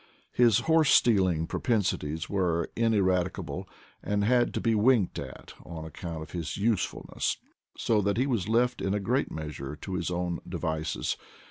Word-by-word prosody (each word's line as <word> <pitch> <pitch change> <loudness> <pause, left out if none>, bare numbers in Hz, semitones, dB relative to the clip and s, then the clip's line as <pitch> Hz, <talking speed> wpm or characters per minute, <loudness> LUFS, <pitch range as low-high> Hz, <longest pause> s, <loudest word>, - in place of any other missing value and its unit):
His 120 -2 +4
horse 160 +1 +3
stealing 95 -8 +4
propensi 110 0 0
ties 80 +2 -4
were 85 -4 0
ineradicable, 95 -6 0 0.3
and 100 0 0
had 120 +2 +3
to - - +1
be 115 - +1
winked 110 -2 +3
at - - -9
on 80 -2 -7
account 80 0 -6
of 80 - -12
his 80 -3 -4
usefulness; 105 0 -1 0.4
so 110 -2 +2
that 100 +1 0
he 130 - +2
was 115 -8 -1
left 120 +2 +2
in 95 - 0
/a 105 - -2
great 125 +7 +1
measure 75 -2 -6
to 95 +5 -7
his 90 -2 -1
own 90 -1 -2
devices. 80 0 -2
95 Hz, 160 wpm, -28 LUFS, 85-115 Hz, 0.4 s, His